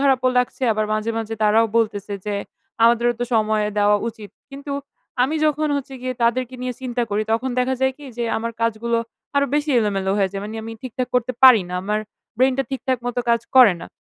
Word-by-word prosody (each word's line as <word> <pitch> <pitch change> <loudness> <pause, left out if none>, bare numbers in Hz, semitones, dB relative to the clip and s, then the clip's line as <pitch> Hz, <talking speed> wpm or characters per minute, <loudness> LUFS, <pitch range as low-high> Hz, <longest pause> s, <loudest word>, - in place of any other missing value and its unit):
খারাপও 265 -2 +3
লাগছে 250 +1 -1
আবার 215 0 -1
মাঝে, 215 +1 -1
মাঝে 225 0 -4
তারাও 220 +2 +4
বলতেছে 210 -3 0
যে, 205 - -1 0.5
"আমাদেরও 235 +1 +4
তো 245 - +1
সময় 215 -1 +2
দেওয়া 205 0 +4
উচিত।" 215 -3 -10 0.2
কিন্তু 280 +1 -7 0.5
আমি 270 +5 +1
যখন 305 0 +1
হচ্ছে 270 -1 -6
গিয়ে 255 0 -3
তাদেরকে 250 +2 +1
নিয়ে 250 -1 -3
চিন্তা 245 -1 -2
করি, 210 +1 0
তখন 240 +4 0
দেখা 255 +1 +1
যায় 265 0 +2
কি? 290 - -12
যে, 240 - -1
আমার 230 +1 -3
কাজগুলো 230 +1 0 0.4
আরো 280 - +3
বেশি 295 0 0
এলোমেলো 195 -2 -1
হয়ে 195 - +2
যায়। 195 - -4
মানি 215 +2 -6
আমি 225 - -7
ঠিকঠাক 255 -1 -4
করতে 250 0 +1
পারি 250 -7 +9
না। 180 - -5
আমার 210 +2 -1 0.4
ব্রেইন 260 +1 +3
টা 270 - +3
ঠিকঠাক 260 -1 -1
মতো 245 0 -1
কাজ 235 - +3 0.2
করে 235 -8 +8
না। - - -7
235 Hz, 205 wpm, -21 LUFS, 215-260 Hz, 0.5 s, পারি